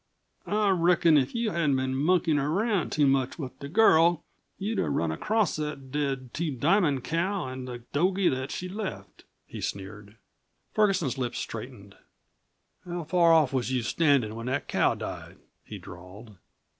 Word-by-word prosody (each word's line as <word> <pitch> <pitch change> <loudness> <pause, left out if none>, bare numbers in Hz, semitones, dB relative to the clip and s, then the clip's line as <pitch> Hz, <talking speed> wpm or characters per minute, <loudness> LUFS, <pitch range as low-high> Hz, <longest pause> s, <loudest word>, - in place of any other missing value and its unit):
"I 210 0 +1
reckon 170 -2 +4
if 135 - +1
you 230 -2 0
hadn't 155 -6 +1
been 130 0 -1
monkeyin' 155 +2 +2
around 185 +6 0
too 150 - +2
much 135 -1 +1
with 135 -6 -7
the 140 - -7
girl, 170 -3 +4 0.3
you'd 215 +3 -2
have - - 0
run 80 -1 0
across 210 - 0
that 150 -3 -5
dead 135 -3 -2
Two 155 -3 -2
Diamond 145 - +2
cow 175 0 -1
an' 130 0 -6
the 120 -2 -8
dogie 185 +5 +2
that 130 +1 -3
she 180 - -5
left," 195 +1 -7 0.2
he - - -9
sneered. 100 +1 -6 0.6
Ferguson's 190 - +1
lips 125 -2 -2
straightened. 110 -3 -7 0.9
"How 175 -1 -5
far 170 +1 +3
off 155 -5 +4
was 130 -1 -1
you 125 -2 0
standin' 140 -6 +2
when 115 +2 -6
that 130 +3 -2
cow - - +2
died?" - - -7 0.3
he - - -9
drawled. 95 +5 -12
145 Hz, 160 wpm, -27 LUFS, 130-175 Hz, 0.9 s, reckon